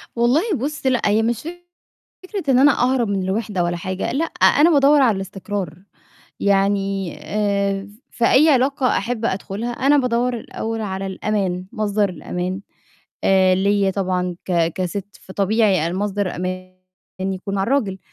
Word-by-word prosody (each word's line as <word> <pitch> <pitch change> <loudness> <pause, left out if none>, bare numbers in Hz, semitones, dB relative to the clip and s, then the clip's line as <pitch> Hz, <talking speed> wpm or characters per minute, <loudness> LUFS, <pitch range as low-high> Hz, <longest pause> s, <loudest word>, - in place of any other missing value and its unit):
والله، 240 +6 +3
بُصّ، 285 +2 -4
لأ، 255 -2 +2
هي 210 +2 +3
مش 230 0 -1 0.8
فكرة 370 -6 -3
إن 250 - +4
أنا 285 +2 +6
أهرب 250 -3 +2
من 200 -1 -1
الوِحدة 195 -2 -1
ولا 175 0 -1
حاجة، 185 +2 -3
لأ، 285 +6 0
أنا 320 0 +4
بادوّر 290 -1 +5
على 235 -6 +3
الاستقرار. 195 -3 -5 0.6
يعني 195 -2 +1
آآ، 200 -1 -1 0.2
ف 235 - -4
في - - +4
أي 305 +4 +6
علاقة 270 0 +2
أحِب 230 +2 -2
أدخُلها، 200 +3 -3
أنا 275 +4 +3
بادوّر 250 -1 +1
الأول 225 0 -5
على 195 -2 -4
الأمان، 190 -2 -2
مصدر 210 -3 0
الأمان 180 +2 -4 0.6
آآ، 185 -1 +4
ليّا 200 0 +2
طبعًا 180 -2 -1
ك 170 -3 +1
كسِت، 195 +2 -4
فطبيعي 195 -3 +1
أنا 170 - -3
مصدر 205 -2 -2
أماني 185 0 -5 0.5
يكون 190 +1 -3
مع 195 - 0
الراجل. 210 -6 0
200 Hz, 150 wpm, -20 LUFS, 190-240 Hz, 0.8 s, أنا